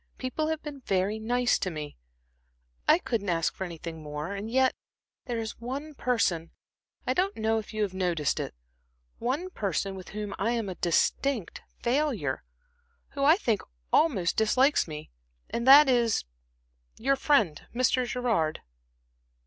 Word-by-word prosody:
"People 270 +4 -2
have 315 -1 -2
been 295 -2 -7
very 200 -2 0
nice 245 +2 +2
to 185 - -1
me. 150 -3 -6 0.9
I - - +8
I - - +1
couldn't 225 - -2
ask 165 -2 +1
for 190 - -4
anything 165 -2 -7
more. 150 +4 -5
And 200 +2 -5
yet 260 +2 +3 0.5
there 240 -3 -2
is 220 -1 -5
one 275 +6 -5
person 205 - 0 0.6
I - - +1
don't 380 +3 0
know 220 0 +1
if 215 - -9
you 215 -1 -1
have 195 -3 -2
noticed 175 -6 0
it - - -4 0.6
one 290 +10 -2
person 195 - -2
with 185 -1 -9
whom 210 -1 -5
I 225 +5 +1
am 225 -4 -2
a - - -3
distinct 200 - 0 0.2
failure, 285 +5 0 0.7
who 275 - -3
I 305 +4 +7
think 230 - 0 0.3
almost 200 - +3
dislikes 255 +5 +3
me, 150 -1 -8 0.4
and 235 +2 -2
that 285 +2 +10
is 235 - +2 0.7
your 275 +4 +2
friend 225 - +2
Mr. 255 0 +2
Gerard." 225 -12 0
225 Hz, 155 wpm, -28 LUFS, 185-265 Hz, 0.9 s, that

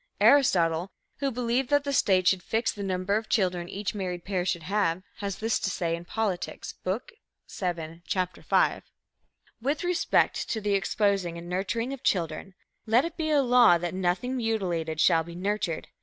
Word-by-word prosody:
Aristotle, 175 - +4 0.3
who 275 0 0
believed 245 +1 -1
that 290 -1 +3
the 280 -1 -2
state 185 -7 +3
should 190 -1 +3
fix 225 +5 0
the 205 - -8
number 190 +1 0
of 220 0 -5
children 180 -4 0
each 200 +1 -3
married 180 -4 -4
pair 185 -3 -1
should 175 -3 -1
have, 185 -1 0
has 200 -3 -4
this 225 +1 0
to - - -1
say 170 -3 -1
in 170 +1 -9
Politics, 200 -2 -3
Book 200 - -3 0.4
VII, 170 -3 -4
Chapter 185 -1 -2
V: - - +2 0.8
"With 285 +6 -1
respect 355 0 +1
to 220 - -1
the 205 -1 0
exposing 195 -2 +1
and 170 +1 -8
nurturing 230 +8 -2
of 270 - -8
children, 180 -2 -1 0.3
let 235 +6 +4
it 335 0 -5
be 320 -2 -2
a 290 -2 +4
law 240 -7 +6
that 175 0 -4
nothing 190 +8 -1
mutilated 180 -9 -1
shall 165 -1 +4
be 170 +1 -10
nurtured. 190 -3 -2
195 Hz, 175 wpm, -27 LUFS, 175-230 Hz, 0.8 s, law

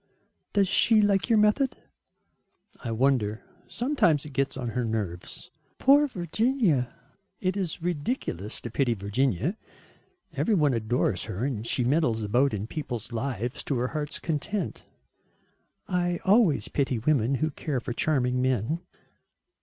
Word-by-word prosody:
"Does 200 -2 +3
she 225 +4 +4
like 205 +1 +2
your 225 - +5
method?" 215 +6 +3 1.1
"I 120 - -3
wonder. 115 -3 +1 0.2
Sometimes 230 - +1
it 150 - -9
gets 135 0 -1
on 125 -3 -3
her 125 +2 -1
nerves." 105 -6 -4 0.3
"Poor 285 +2 +5
Virginia." 185 - +1 0.5
"It 185 0 0
is 180 -4 -3
ridiculous 145 - -2
to 120 - -6
pity 120 -2 +1
Virginia. 115 - 0 0.8
Every 225 - +1
one 150 -6 +3
adores 110 -4 0
her 105 +8 -3
and 115 -5 -3
she 125 - +1
meddles 125 -4 +1
about 125 +7 +2
in 105 -1 -3
people's 120 -4 -5
lives 120 +1 -3
to 140 - 0
her 125 +1 0
heart's 150 -1 -3
content." 165 +6 -3 1.0
"I 175 -1 0
always 190 - +4
pity 135 -3 0
women 130 +1 +2
who 155 +3 0
care 145 -2 -3
for 120 - -5
charming 125 -3 +1
men." 130 - 0
140 Hz, 140 wpm, -27 LUFS, 120-180 Hz, 1.1 s, your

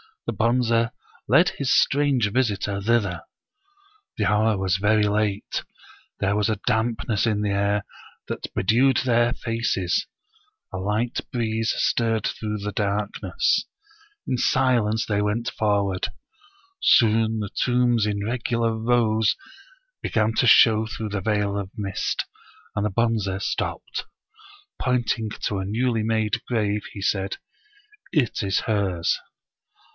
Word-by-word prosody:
The - - -2
Bonze 115 0 +2 0.4
led - - +5
his 135 -2 -2
strange 135 -7 +2
visitor 100 -5 0
thither. 100 -6 0 0.9
The - - +1
hour 105 0 +2
was 95 -1 +1
very 105 +2 +3
late; 105 -1 -1 0.6
there 100 +1 +1
was 105 +1 +1
a 110 - -1
dampness 110 0 0
in 105 -2 +1
the 105 -1 0
air 100 +1 +1 0.4
that - - -5
be - - 0
dewed 120 +6 +4
their 120 -1 +2
faces; 115 -8 -1 0.7
a - - -3
light 105 +5 -1
breeze 115 -2 0
stirred 115 -2 +1
through 105 -1 -3
the 105 +1 -4
dark 100 +1 -2
ness. - - +1 0.6
In 125 - 0
silence 120 -4 +2
they 105 -1 0
went 105 +3 -1
forward. 100 -3 0 0.7
Soon 110 -1 +4
the 105 -2 -3
tombs 120 -2 +2
in 100 -1 -2
regular 115 -1 0
rows 110 -2 +2 0.7
began 110 0 +1
to 125 - +3
show 110 -1 +6
through 110 0 -5
the 100 -1 -3
veil 105 -1 0
of 100 -2 -4
mist, 100 -4 -2 0.5
and 100 - 0
the - - +1
Bonze 100 -3 0
stopped. - - -3 0.7
Pointing 120 -3 0
to 100 - -1
a 95 - -3
newly 115 +2 0
made 110 -1 0
grave 105 -3 0
he 100 - -7
said 95 0 -1 0.4
" 420 0 -29
It 120 - -3
is 95 -2 0
hers." 95 -6 0
110 Hz, 135 wpm, -24 LUFS, 100-115 Hz, 0.9 s, show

